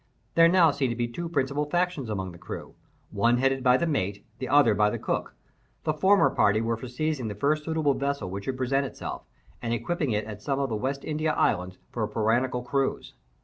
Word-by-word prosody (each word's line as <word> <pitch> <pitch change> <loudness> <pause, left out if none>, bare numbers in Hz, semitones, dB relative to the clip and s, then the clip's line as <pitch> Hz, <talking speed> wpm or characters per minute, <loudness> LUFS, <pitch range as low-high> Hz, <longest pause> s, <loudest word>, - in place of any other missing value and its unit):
There 165 0 +7
now 170 -2 +5
seemed 140 -2 0
to - - -3
be 120 0 -1
two 170 +8 -5
principal 140 -1 0
factions 175 -7 0
among 95 -3 -3
the 85 - -13
crew—one 115 +4 -3
headed 135 +1 +1
by 125 -1 +5
the 170 - 0
mate, 100 - -2
the 130 - -4
other 145 -6 +5
by 105 0 +3
the - - -3
cook. - - -3 0.5
The 155 - +1
former 190 +6 +4
party 105 0 +3
were 115 +1 0
for 115 +3 -8
seizing 135 0 -2
the 105 - -4
first 150 +1 0
suitable 160 -3 +1
vessel 140 -6 -2
which 100 +1 -5
should 130 -1 -2
present 135 +2 +1
itself, - - -7 0.4
and 115 0 -1
equipping 150 +5 -2
it 105 -1 0
at 105 -1 -8
some 135 +4 -1
of 140 -1 0
the 110 - -1
West 135 +5 -3
India 155 0 0
Islands 90 +1 0
for 120 - -4
a 105 - +1
piratical 120 +3 +1
cruise. 135 +2 -1
130 Hz, 215 wpm, -27 LUFS, 110-150 Hz, 0.5 s, There